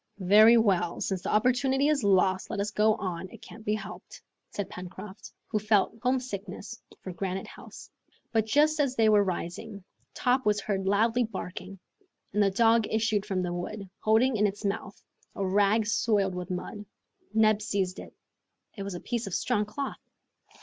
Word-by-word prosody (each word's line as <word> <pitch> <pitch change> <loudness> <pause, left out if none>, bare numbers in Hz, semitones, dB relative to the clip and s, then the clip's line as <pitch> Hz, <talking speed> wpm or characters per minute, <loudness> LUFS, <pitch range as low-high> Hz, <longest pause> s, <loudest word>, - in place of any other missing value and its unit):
"Very 210 +5 +7
well, 185 -6 +1
since 190 -2 -2
the - - -4
opportunity 255 +5 +2
is 300 -5 +1
lost, 190 -1 +2
let - - -3
us 200 +1 -1
go 215 +1 +3
on; 185 -3 -5
it - - -13
can't 220 - -12
be 210 0 0
helped," - - -9 0.3
said 205 -2 -4
Pencroft, 190 +2 -9
who 215 - -1
felt 210 -1 +2
home 255 +1 +2
sickness 205 -2 -7 0.2
for 185 - -6
Granite 190 +1 -3
House. - - -12 0.4
But 220 -2 +1
just 300 +6 +3
as 275 -3 +1
they 225 -2 +4
were 210 -1 +5
rising, 195 +3 -5 0.3
Top 255 +1 +1
was 210 -1 +2
heard 195 -1 -2
loudly 225 +5 +3
barking; 190 -2 -7 0.6
and 210 - +2
the 200 - +4
dog 225 +2 +3
issued 220 -2 0
from 185 -2 -1
the 175 -1 -2
wood, 195 +3 -5
holding 225 +3 +3
in 210 0 +3
his 205 +1 -6
mouth 200 0 -3 0.4
a 200 - -2
rag 205 +3 +3
soiled 205 -2 +1
with 180 0 -5
mud. 185 +3 -5 0.5
Neb 215 -1 +3
seized 195 -4 -2
it. - - -10 0.6
It 200 - -7
was 195 -2 -5
a - - -5
piece 235 -3 -3
of 190 - -3
strong 210 -4 0
cloth! 275 +7 -5
210 Hz, 175 wpm, -28 LUFS, 190-225 Hz, 0.6 s, Very